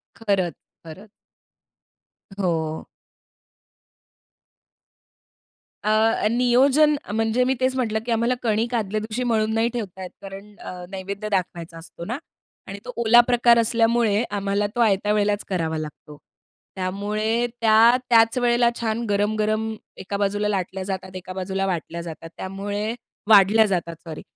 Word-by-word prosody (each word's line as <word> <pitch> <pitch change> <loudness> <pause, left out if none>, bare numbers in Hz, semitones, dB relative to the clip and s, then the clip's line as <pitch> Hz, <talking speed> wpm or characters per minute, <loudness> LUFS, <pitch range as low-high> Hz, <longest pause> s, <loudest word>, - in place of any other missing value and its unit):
खरंच, 195 -6 0 0.3
खरंच. 195 +6 -12 1.3
हो. 160 -4 -1 3.0
अ, 215 0 +2
नियोजन 265 +5 +4 0.2
म्हणजे 225 +3 +1
मी 260 +1 +2
तेच 260 0 +1
म्हटलं 220 -4 0
की 240 - -3
आम्हाला 235 +2 +1
कणिक 225 +2 0
आदल्या 215 -1 -1
दिवशी 225 +3 -3
मळून 220 -2 +1
नाही 225 +1 +2
ठेवता 190 -5 -5
येत 180 - -6
कारण 195 +1 -10
अ, 180 -1 -8
नैवेद्य 200 +2 -5
दाखवायचा 170 -3 -3
असतो 170 +1 -10
ना. 240 +5 -3 0.5
आणि 200 +1 -7
तो 250 - -5
ओला 235 +1 +6
प्रकार 240 -1 +4
असल्यामुळे 230 -1 +2
आम्हाला 200 0 0
तो - - -3
आयत्या 205 -1 +2
वेळेलाच 205 0 +1
करावा 165 -4 -1
लागतो. 150 -1 -8 0.6
त्यामुळे 210 +5 -1 0.2
त्या 225 +2 +6
त्याच 230 +1 +5
वेळेला 240 -1 +3
छान 230 0 -1
गरम-गरम 215 +2 0 0.2
एका 200 +1 -4
बाजूला 205 +1 0
लाटल्या 190 -1 -2
जातात, 190 -1 -5
एका 185 0 -7
बाजूला 190 +1 -2
वाटल्या 170 -1 -3
जातात, 165 -1 -8
त्यामुळे 205 +4 -4 0.3
वाढल्या 210 +1 +6
जातात 170 -4 -2
सॉरी. 160 -2 -8
210 Hz, 130 wpm, -23 LUFS, 190-230 Hz, 3.0 s, ओला